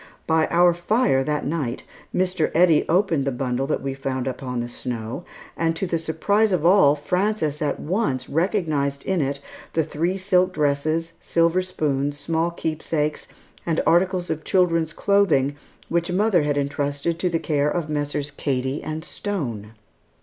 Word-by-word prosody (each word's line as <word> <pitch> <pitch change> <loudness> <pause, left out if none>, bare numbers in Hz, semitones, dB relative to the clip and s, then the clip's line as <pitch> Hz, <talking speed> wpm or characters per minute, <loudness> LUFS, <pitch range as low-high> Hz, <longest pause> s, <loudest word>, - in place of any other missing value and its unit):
By 160 -1 +2
our 175 0 +4
fire 175 - +2
that 150 -1 -1
night, 140 -5 -2 0.3
Mr. 180 -3 +1
Eddy 165 -2 +4
opened 170 -4 +2
the 135 - 0
bundle 125 +1 -2
that 150 - -1
we 135 - -2
had 135 - -13
found 130 -1 -2
upon 125 -1 -3
the 120 - -2
snow, 120 +4 -5 0.3
and 165 -1 0
to 180 - -1
the 170 -2 -1
surprise 200 +7 +1
of 170 -4 0
all, 175 -6 +6
Frances 180 -1 -1
at 145 -2 -1
once 155 - -1
recognized 155 -5 0
in 190 -3 +1
it 140 0 -1 0.3
the 160 - +2
three 165 +5 -1
silk 185 -1 +2
dresses, 155 +2 0
silver 170 +2 +2
spoons, 145 -6 -1
small 165 +3 0
keepsakes, 155 -2 -2 0.4
and 165 -2 0
articles 180 +1 +2
of 155 0 -3
children's 170 -4 +2
clothing 165 -10 +2 0.3
which 170 +1 0
mother 195 -1 +3
had 145 -1 0
intrusted 145 +3 -1
to 180 - +1
the 170 - +1
care 150 -2 0
of 165 0 -2
Messrs. 145 -1 -2
Cady 135 -1 -2
and 155 +1 -5
Stone. 120 - -4
160 Hz, 160 wpm, -23 LUFS, 140-175 Hz, 0.4 s, all